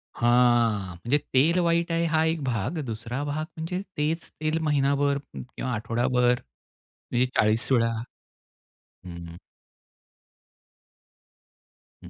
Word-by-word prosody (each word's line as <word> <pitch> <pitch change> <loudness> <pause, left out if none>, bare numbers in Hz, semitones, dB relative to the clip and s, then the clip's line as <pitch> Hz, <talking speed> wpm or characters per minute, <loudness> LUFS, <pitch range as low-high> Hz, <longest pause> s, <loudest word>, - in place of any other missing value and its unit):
हां, 120 -4 +3
म्हणजे 120 +11 +1 0.2
तेल 160 +7 +4
वाईट 170 0 +1
आहे 165 0 +1
हा 160 0 +4
एक 160 -1 0
भाग. 125 - -2
दुसरा 120 +4 -4
भाग 145 +2 -2
म्हणजे 175 +3 -3 0.2
तेच 155 +3 -1
तेल 155 +1 0
महिनाभर 140 -1 +2 0.2
किंवा 130 0 -5
आठवडाभर 120 +2 +1 0.6
म्हणजे 125 +1 -1
40 110 +4 +2
वेळा 115 -3 +3 0.9
हं. 85 -2 -11 2.7
हं. - - -10
130 Hz, 105 wpm, -26 LUFS, 115-155 Hz, 2.7 s, तेल